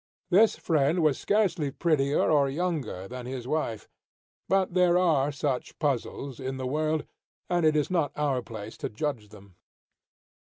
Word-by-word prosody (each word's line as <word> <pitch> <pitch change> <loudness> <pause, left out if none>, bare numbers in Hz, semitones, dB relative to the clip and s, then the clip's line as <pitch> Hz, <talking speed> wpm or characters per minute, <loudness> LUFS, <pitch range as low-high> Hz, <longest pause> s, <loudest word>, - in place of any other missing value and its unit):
This 210 +5 +5
friend 160 +1 +1
was 150 -4 +2
scarcely 185 -8 +1
prettier 145 -1 +1
or 140 -3 +4
younger 140 - -3
than 125 +1 -7
his 125 -2 -5
wife; 125 -8 -2 0.6
but 190 -2 +2
there 180 -1 +4
are 150 -6 +3
such 140 -3 -3
puzzles 135 -2 -2
in 130 0 -4
the 130 - -4
world, 155 +3 0 0.5
and 175 -2 +3
it 155 - +3
is 150 +3 +1
not 165 -6 +1
our 140 -4 0
place 110 -2 -8
to - - -4
judge 110 -2 -3
them. 100 -3 -16
145 Hz, 155 wpm, -27 LUFS, 130-165 Hz, 0.6 s, This